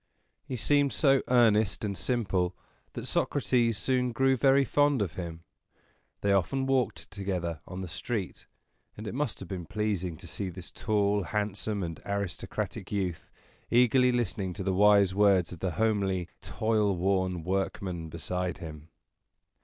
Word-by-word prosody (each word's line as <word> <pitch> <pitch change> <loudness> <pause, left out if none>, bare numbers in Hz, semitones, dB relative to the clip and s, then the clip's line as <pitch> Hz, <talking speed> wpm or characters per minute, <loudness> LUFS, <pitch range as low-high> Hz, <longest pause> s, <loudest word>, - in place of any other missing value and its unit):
He 130 - -3
seemed 140 +3 +2
so 135 -3 +4
earnest 110 -4 +3
and 100 -1 -2
simple 95 -7 0 0.4
that - - -5
Socrates 115 -3 +1
soon 125 +2 0
grew 135 +2 +3
very 135 +2 +4
fond 145 -1 +3
of 100 -6 -1
him. 85 -2 -6 0.8
They 100 -1 +2
often 130 +8 +1
walked 130 -3 0
together 90 -5 -3
on 95 0 -6
the 95 - -5
street; 95 +5 -4 0.5
and 110 - -7
it - - -4
must 135 -4 -2
have 95 - -7
been 90 -3 -6
pleasing 100 -6 -2
to 90 - -11
see 95 +2 -4
this 90 0 -9
tall, 105 -1 +1
handsome, 105 +1 -2
and 85 -2 -5
aristocratic 100 -3 -3
youth, 90 -5 -2 0.4
eagerly 125 +1 +5
listening 105 -6 -1
to 95 - -5
the 95 0 0
wise 100 -1 +5
words 95 -3 +4
of 90 - -8
the 90 -1 -2
homely, 100 -5 0
toil 110 -3 +1
worn 95 -1 0
workman 95 -2 -2
beside 90 +2 -3
him. 80 -1 -9
100 Hz, 150 wpm, -29 LUFS, 90-115 Hz, 0.8 s, eagerly